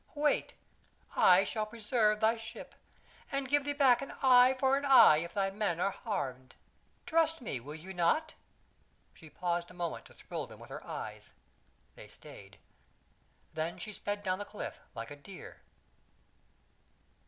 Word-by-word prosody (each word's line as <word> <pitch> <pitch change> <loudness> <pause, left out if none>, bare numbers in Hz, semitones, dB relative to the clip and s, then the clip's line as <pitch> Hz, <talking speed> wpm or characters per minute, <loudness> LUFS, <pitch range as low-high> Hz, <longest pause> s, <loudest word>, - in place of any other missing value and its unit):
"Wait. 295 0 0 0.6
I 185 +2 +6
shall 215 +2 -3
preserve 215 -1 +1
thy 220 +1 +4
ship, 225 0 -10 0.6
and 275 -1 -1
give 290 +1 +2
thee 290 - 0
back 270 -4 +4
an 275 - -7
eye 255 0 +7
for 265 0 +3
an 280 - -2
eye 270 - +8
if 170 +2 -5
thy 195 -1 0
men 195 -4 -1
are 195 +2 +1
harmed. 130 - -5 0.5
Trust 325 0 +2
me, 210 - -4
will 145 +5 -9
ye 180 +4 -9
not?" 190 - +1 0.8
She 160 - -15
paused 175 +1 -2
a 180 - -14
moment 175 -2 -4
to - - -17
thrill - - -6
them - - -14
with - - -13
her - - -7
eyes; - - -7 0.6
they - - -13
stayed. - - -14 1.0
They 160 +2 -3
she 210 - -7
sped 205 0 -4
down 185 0 -1
the - - -3
cliff 210 - -7 0.2
like 115 +3 -7
a - - -7
deer. 180 +6 -12
210 Hz, 160 wpm, -32 LUFS, 175-260 Hz, 1.0 s, eye